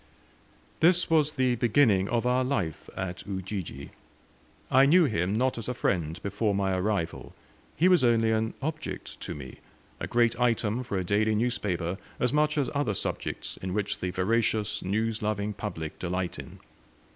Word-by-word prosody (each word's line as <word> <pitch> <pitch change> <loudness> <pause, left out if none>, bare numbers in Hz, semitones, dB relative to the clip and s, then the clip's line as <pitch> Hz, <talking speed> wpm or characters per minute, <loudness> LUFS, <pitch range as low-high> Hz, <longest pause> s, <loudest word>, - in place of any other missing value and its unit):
This 175 +1 +4
was 155 -2 +3
the 130 -2 +2
beginning 115 -4 +3
of 120 0 0
our 125 +1 +3
life 100 - -2
at 95 -1 -4
Ujiji. 95 -7 -5 0.8
I 135 +2 +6
knew 170 +3 +6
him 100 - 0
not 125 +1 +1
as 115 - -5
a 125 - -2
friend 85 -6 -1
before 105 +1 0
my 95 -1 +1
arrival. 95 -3 -2 0.4
He 175 - +4
was 180 -6 +5
only 115 -2 +3
an 110 0 0
object 155 +1 -5
to - - -5
me 65 -3 -9 0.4
a - - -3
great 120 0 +2
item 120 -1 +1
for 120 -6 -3
a 95 - 0
daily 105 +4 +2
newspaper, 100 -6 -1 0.2
as 125 +2 +1
much 150 0 +2
as 140 -3 +2
other 140 -8 0
subjects - - -4
in 95 0 -4
which 105 0 -1
the 90 - -2
voracious 105 +3 0
news 110 +3 -1
loving 105 0 -1
public 95 -6 -5
delight 90 -1 -2
in. - - -9
110 Hz, 165 wpm, -28 LUFS, 95-125 Hz, 0.8 s, I